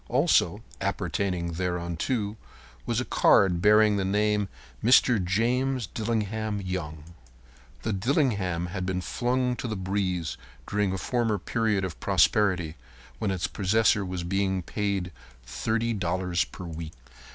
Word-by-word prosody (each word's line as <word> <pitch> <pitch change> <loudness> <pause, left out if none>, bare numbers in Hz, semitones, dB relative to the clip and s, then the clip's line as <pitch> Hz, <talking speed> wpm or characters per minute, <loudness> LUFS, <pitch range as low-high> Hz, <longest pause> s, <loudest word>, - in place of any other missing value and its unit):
Also - - +2 0.2
appertaining 90 -4 -1
thereunto 90 +5 -2 0.5
was - - +1
a - - -2
card 90 -3 +4
bearing 105 +1 +5
the 100 - 0
name 105 +1 +1 0.3
"Mr. 120 -3 +5
James 120 +6 +1
Dillingham 110 0 -2
Young." 85 -5 -4 0.8
The 110 - -1
"Dillingham" 100 - 0
had 95 +1 -4
been 90 0 -1
flung 125 +4 0
to - - -4
the 110 - -3
breeze 95 -3 -2 0.3
during 100 -1 0
a 95 - -2
former 115 +2 0
period 105 0 0
of 90 -5 -7
prosperity 90 -6 +2 0.4
when 110 - -1
its 95 -2 -1
possessor 105 +1 +2
was 90 -2 -4
being 95 0 0
paid 100 -2 -2 0.3
$30 95 - -1
per 90 - -8
week. 80 -1 -7
100 Hz, 125 wpm, -27 LUFS, 90-110 Hz, 0.8 s, bearing